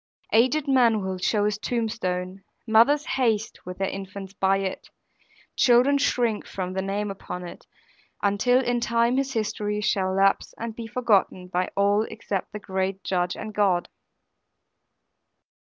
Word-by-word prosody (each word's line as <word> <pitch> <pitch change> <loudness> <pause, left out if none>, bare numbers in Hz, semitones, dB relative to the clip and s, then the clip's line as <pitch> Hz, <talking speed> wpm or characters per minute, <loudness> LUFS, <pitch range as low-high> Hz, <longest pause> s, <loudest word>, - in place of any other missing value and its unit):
Aged 260 +6 +3
men 235 -6 +3
will 190 -1 -3
show 205 +2 +1
his 210 -1 -1
tombstone; 195 -5 -3 0.2
mothers 240 +7 +4
haste 225 -4 0
with 180 - -6
their 195 - -1
infants 195 0 -7
by 195 -1 +2
it; 195 -1 -4 0.7
children 255 +3 +4
shrink 240 -6 0
from 185 -1 -4
the 190 - -1
name 200 +1 -2
upon 180 -2 -7
it, - - -12 0.6
until 245 +6 +3
in 245 0 +1
time 235 +1 +1
his 270 0 -1
history 210 -2 -2
shall 195 -3 0
lapse 195 0 +2
and 230 -1 -5
be 230 -1 -6
forgotten 210 -6 +1
by 180 0 -1
all 200 +1 +3
except 200 -4 -4
the - - -5
great 190 -1 -3
Judge 180 -1 -1
and 215 0 -7
God. 190 -4 +1
205 Hz, 145 wpm, -25 LUFS, 190-235 Hz, 0.7 s, mothers